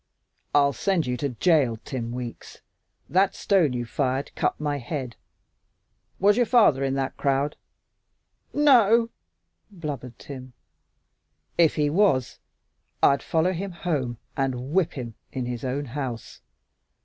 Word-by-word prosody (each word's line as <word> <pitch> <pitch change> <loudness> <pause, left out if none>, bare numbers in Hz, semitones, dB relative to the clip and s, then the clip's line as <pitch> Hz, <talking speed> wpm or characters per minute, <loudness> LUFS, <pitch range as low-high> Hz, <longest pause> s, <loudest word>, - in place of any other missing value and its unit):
"I'll 140 -1 +4
send 190 -1 0
you 125 0 -1
to 140 +3 -1
jail, 130 -2 +2
Tim 120 -4 -4
Weeks. 120 -1 -7 0.5
That 190 +2 +2
stone 175 -9 +2
you 120 -1 -2
fired 135 +2 -1
cut - - -1
my 145 -1 -1
head. 130 - -5 1.0
Was 205 +3 +4
your 245 - +4
father 210 - +4
in 135 0 0
that 135 -1 -2
crowd?" 140 +1 0 1.0
"No 290 -5 +6
o 210 +1 +2
o!" 230 - -9 0.6
blubbered 145 - -6
Tim. 130 -2 -9 1.0
"If 165 -3 +4
he 150 -2 +1
was, 160 - +2 0.6
I'd 140 0 +5
follow 165 +3 +1
him 195 +3 -4
home 140 -9 -2 0.2
and 130 -1 -2
whip 180 -2 +2
him 120 -4 -6 0.2
in 130 -2 -3
his 120 -1 -5
own 135 +3 -2
house. 125 -3 -6
140 Hz, 135 wpm, -25 LUFS, 125-170 Hz, 1.0 s, No